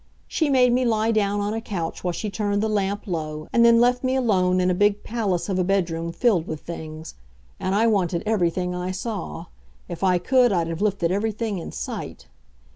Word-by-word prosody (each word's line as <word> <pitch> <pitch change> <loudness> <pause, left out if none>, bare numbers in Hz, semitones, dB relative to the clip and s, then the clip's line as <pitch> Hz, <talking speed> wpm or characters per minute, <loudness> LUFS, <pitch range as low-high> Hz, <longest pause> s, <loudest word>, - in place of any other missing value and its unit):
She 315 -3 0
made 250 -3 +4
me 255 +1 +2
lie 225 -1 +2
down 205 -2 +1
on 205 +1 -1
a 225 - -3
couch 175 -7 -4
while 180 - 0
she 210 +4 -4
turned 205 0 -1
the - - +1
lamp 205 -1 -1
low, 155 -4 -4
and 235 - +5
then 235 0 +6
left 245 +1 +3
me 260 0 +1
alone 185 -8 +2
in 185 0 +2
a - - +2
big 205 +2 +2
palace 210 -7 -1
of 190 -2 -1
a - - +3
bedroom 170 -3 -1
filled 195 -5 +1
with 155 -2 -5
things. 160 -1 -8 0.5
And 190 - -1
I 220 +3 +3
wanted 185 -6 +1
everything 180 -4 0
I 180 0 -3
saw. 190 - -5 0.4
If 170 +2 -6
I 185 -2 +4
could, 250 +6 +3
I'd 175 -4 +1
have 165 +2 -4
lifted 195 -5 +1
everything 210 0 -1
in - - -7
sight. - - -6
200 Hz, 205 wpm, -23 LUFS, 175-225 Hz, 0.5 s, then